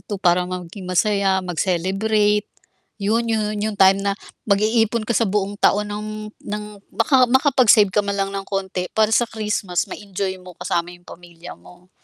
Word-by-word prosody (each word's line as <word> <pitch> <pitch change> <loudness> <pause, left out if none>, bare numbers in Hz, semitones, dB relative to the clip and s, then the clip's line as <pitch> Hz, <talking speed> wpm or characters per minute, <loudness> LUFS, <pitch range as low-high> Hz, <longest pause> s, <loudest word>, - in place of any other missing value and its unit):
ito 205 - -4
para 180 -1 +2
maging 180 +1 -7
masaya 195 0 +1
mag-celebrate 195 +4 0 0.5
yun 225 +3 0
yun 215 -1 -1
yung 215 -1 -2
time 195 0 +5
na 200 0 -1 0.3
mag-iipon 220 +2 +2
ka 235 - -1
sa 225 -1 +1
buong 205 0 -2
taon 210 +1 +2
ng 210 +1 -5 0.3
ng 210 0 -5 0.3
maka 255 -4 +4
makapag-save 250 -7 +4
ka 210 - +3
man 200 0 -3
lang 195 0 -1
ng 195 0 -4
konti 190 -2 -3
para 220 0 +3
sa 240 0 +3
Christmas 210 -5 -2
ma-enjoy 195 -2 -5
mo 180 -1 -13
kasama 170 0 -2
yung 175 0 -16
pamilya 175 -1 -12
mo. 180 +1 -18
200 Hz, 165 wpm, -21 LUFS, 185-215 Hz, 0.5 s, time